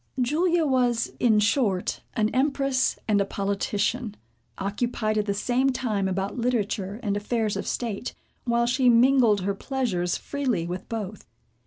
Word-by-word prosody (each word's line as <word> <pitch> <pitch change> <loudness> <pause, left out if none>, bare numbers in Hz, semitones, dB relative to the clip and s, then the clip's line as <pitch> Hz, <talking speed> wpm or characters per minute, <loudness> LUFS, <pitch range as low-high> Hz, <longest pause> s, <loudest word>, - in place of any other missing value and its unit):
Julia 325 +6 +2
was, 250 -4 +1
in 220 -4 +4
short, 205 -3 +1
an 215 -3 +2
empress 275 0 +1
and 205 -2 +3
a - - +4
politician, 200 +3 -2 0.4
occupied 215 +2 -1
at 210 - -2
the 200 - +1
same 250 +6 +1
time 220 -7 -1
about 195 +4 -2
literature, 215 -4 -1
and 205 -2 0
affairs 215 +1 -1
of - - -4
state, 235 -1 -3 0.3
while 235 -1 +1
she 250 +1 +3
mingled 235 -3 +5
her 200 +2 0
pleasures 195 -7 -1
freely 260 -12 -2
with 180 +2 -6
both. 215 -3 -5
225 Hz, 145 wpm, -25 LUFS, 200-255 Hz, 0.4 s, mingled